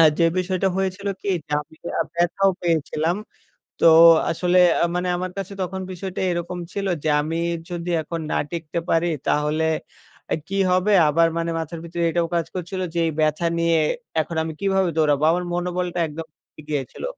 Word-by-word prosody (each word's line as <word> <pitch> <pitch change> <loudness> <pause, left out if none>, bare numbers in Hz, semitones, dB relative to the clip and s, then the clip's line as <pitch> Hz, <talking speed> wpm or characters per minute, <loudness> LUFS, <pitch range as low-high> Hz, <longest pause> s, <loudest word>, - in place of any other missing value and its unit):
আ - - +8 0.2
যে 165 - +5
বিষয়টা 185 +1 0
হয়েছিল 190 +1 -2 0.2
কি 200 - -1 0.2
যে 150 - -8
আমি 155 - -21
যা - - -4 0.2
ব্যাথাও 175 +3 +2
পেয়েছিলাম। 165 +1 0 0.7
তো 165 - +8 0.4
আসলে 180 +2 +2 0.2
আ - - +5
মানে 180 0 -1
আমার 185 0 -3
কাছে 195 0 -5
তখন 190 +1 -4
বিষয়টা 185 +1 -5
এরকম 175 +1 -3
ছিল 200 -1 -3 0.2
যে, 155 - +1
আমি 160 +2 -2 0.3
যদি 175 0 -4
এখন 165 +2 -5
না - - +1
টিকতে 170 0 -3
পারি 165 +1 +2 0.2
তাহলে 150 +2 +1 0.7
আ - - +3
কি 195 0 -1
হবে? 185 +3 +3 0.2
আবার 165 +2 +4
মানে 170 0 -1
মাথার 165 +1 -5
ভিতরে 170 0 -3
এটাও 170 0 0
কাজ 165 -2 +1
করছিল 185 +1 -4
যে 170 - -1
এই - - -1
ব্যাথা 155 +2 +1
নিয়ে 165 -1 +3 0.4
এখন 165 +2 -6
আমি 160 - -4
কিভাবে 190 -2 +2
দৌড়াবো? 150 -2 +2
আমার 180 +1 0
মনোবলটা 175 0 -2
একদম 160 +2 -7
ভেঙ্গে 155 - -18
গিয়েছিল। 140 -4 -4
170 Hz, 180 wpm, -22 LUFS, 160-180 Hz, 0.7 s, আ